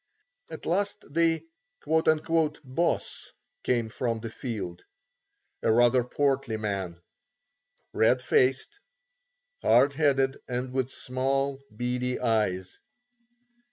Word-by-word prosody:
At - - -8
last 200 +4 0
the 165 - +2 0.4
"Boss" 160 -1 0 0.3
came 120 -3 0
from 115 -1 -2
the 115 0 -6
field; 100 -9 -5 0.8
a - - +2
rather 120 +2 +5
portly 135 -2 0
man, 95 -5 -3 0.9
red 125 +3 +4
faced, 130 - +1 0.8
hard 140 +1 +5
headed 135 -2 +2
and 125 +1 -3
with 130 -1 -1
small, 135 +2 -1 0.2
beady 125 +1 -1
eyes. 105 -6 0
130 Hz, 90 wpm, -27 LUFS, 115-140 Hz, 0.9 s, rather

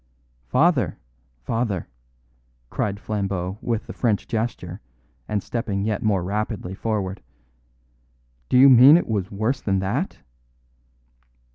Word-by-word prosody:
"Father - - +2 0.5
father," 110 - -2 0.8
cried 100 -1 -2
Flambeau 100 -2 -3
with 115 -2 -2
the - - -8
French 110 -5 0
gesture 110 -5 -3 0.5
and 105 -2 -2
stepping 100 -4 -2
yet 105 -1 -1
more 100 -4 +1
rapidly 105 -1 -3
forward, 100 -2 -3 1.3
"do - - +4
you 135 +2 +9
mean 135 +4 +9
it 175 - -1
was 100 -4 -1
worse 110 +7 -1
than 95 -2 0
that?" 115 - -2
105 Hz, 115 wpm, -23 LUFS, 95-115 Hz, 1.3 s, you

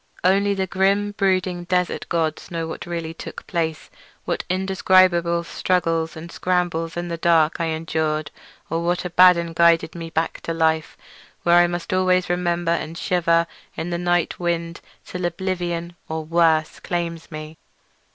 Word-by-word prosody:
Only 200 +2 +3
the 190 -1 0
grim 195 +2 +1
brooding 185 -3 0
desert 180 0 -1
gods 160 -2 -1
know 165 -1 -3
what 160 - -7
really 165 -2 -4
took - - -9
place—what 160 -2 -4
indescribable 185 -2 +3
struggles 165 -2 -1
and 165 +2 -9
scrambles 175 -2 -1
in 175 0 -3
the 170 - -3
dark 165 -1 +3
I - - +1
endured 160 -1 -2 0.4
or 165 +1 -2
what 175 +1 0
Abaddon 175 -1 +5
guided 170 -1 +4
me 165 -1 -6
back 160 0 -2
to 165 - -3
life, 160 -1 +1 0.5
where 170 0 +5
I 175 - +5
must 175 +1 -4
always 185 -1 +2
remember 175 -1 0
and 165 -1 -2
shiver 170 -2 +2 0.3
in 165 +2 -3
the 170 - -1
night 175 -1 0
wind 170 -1 -2 0.2
till 180 0 -6
oblivion—or 175 -2 -3
worse—claims 165 +1 0
me. 155 0 -8
170 Hz, 140 wpm, -22 LUFS, 165-180 Hz, 0.5 s, Abaddon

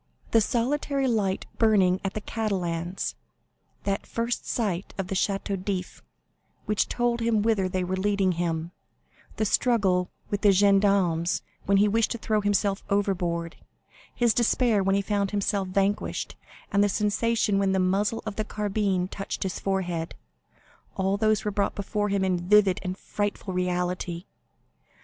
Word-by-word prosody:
The 225 - +5
solitary 270 +4 0
light 205 -5 0
burning 195 -5 +4
at 195 - -3
the 215 - -2
Catalans; 180 -5 -2 0.7
that 195 0 -2
first 235 +1 -2
sight 200 -6 -2
of 190 -1 -3
the 195 - -2
Château 195 -1 -1
d'If, 190 -2 -4 0.6
which 210 -3 +1
told 240 -1 0
him 230 -2 +1
whither 210 -4 +1
they 185 0 -1
were 185 +1 -2
leading 195 -1 +1
him; 170 -1 -2 0.6
the 215 - 0
struggle 195 -6 +2 0.2
with 205 - -1
the 205 - +6
gendarmes 195 -4 +3 0.2
when 200 0 +3
he 205 +2 +5
wished 225 +1 +2
to - - -4
throw 215 -1 0
himself 200 -1 +1
overboard; 175 -5 -1 0.6
his 240 -2 +3
despair 235 -2 +2
when 195 0 +2
he 200 - +1
found 200 -1 0
himself 200 -1 -1
vanquished, 195 +2 -1 0.4
and 200 0 +4
the 205 - +3
sensation 210 0 +1
when 195 -1 +2
the 190 - +1
muzzle 200 +4 +1
of 215 -2 -5
the 215 - 0
carbine 205 -3 -1
touched 195 +1 -5
his 190 -1 -3
forehead—all 190 +1 -4
these 215 0 +1
were 210 - 0
brought 200 0 0
before 205 +1 -2
him 195 -1 +1
in 180 -1 -1
vivid 200 -3 +5
and 185 -1 -4
frightful 205 -2 -3
reality. 180 -1 -2
200 Hz, 150 wpm, -26 LUFS, 185-210 Hz, 0.7 s, the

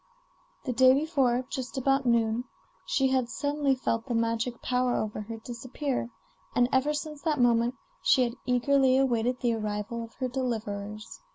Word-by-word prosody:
The 255 - -1
day 260 +2 +6
before, 270 -5 +1
just 260 +1 -4
about 270 0 +2
noon, 230 0 +2 0.4
she 270 -1 +2
had 260 -2 +1
suddenly 285 -1 0
felt 230 -1 -2
the 240 - -1
magic 230 +1 -1
power 250 0 0
over 215 0 -2
her 225 +2 -7
disappear, 245 +3 -4 0.5
and 245 0 +4
ever 265 +3 +2
since 300 0 -5
that 305 -3 0
moment 240 0 +3 0.3
she 260 - +4
had 235 -1 -1
eagerly 260 +1 +3
awaited 250 -2 +1
the 240 -2 +2
arrival 215 +1 -3
of 230 - -11
her 260 - -2
deliverers. 215 -4 -4
250 Hz, 160 wpm, -28 LUFS, 230-265 Hz, 0.5 s, day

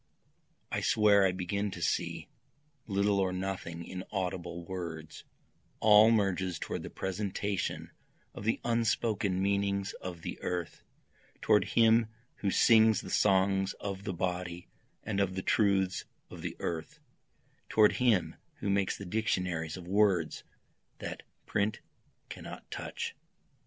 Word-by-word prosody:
I - - -1
swear 105 -3 +5
I - - +1
begin 95 +3 -2
to 90 - -7
see 75 -4 -1 0.6
little 100 0 +2
or 95 -1 +1
nothing 90 -3 -4
in 95 0 -6
audible 90 -3 -3
words, 85 -4 -6 0.5
All 110 0 +7
merges 95 -5 +1
toward - - -4
the - - -7
presentation 100 +1 -3 0.4
of - - -8
the 110 +2 +1
unspoken 110 -4 +1
meanings 100 0 0
of 90 -3 -7
the - - -6
earth, 90 -2 -3 0.6
Toward - - +3
him 115 0 +4 0.3
who 100 - -1
sings 110 +1 +5
the - - -8
songs 95 -1 +3
of 100 -1 -6
the 100 - -3
body 90 0 -3 0.4
and 100 -2 -2
of 95 -2 0
the 95 - -3
truths 100 -3 +2 0.3
of - - -9
the - - -4
earth, 80 -2 -4 0.7
Toward 105 -1 +5
him 115 -8 +2 0.2
who 100 - -2
makes 100 -1 +1
the 100 - -7
dictionaries 90 -5 -1
of 90 -1 -10
words 95 -4 +2 0.5
that - - -6 0.2
print 105 +1 0 0.5
cannot - - -9
touch. - - -5
95 Hz, 130 wpm, -31 LUFS, 90-105 Hz, 0.7 s, All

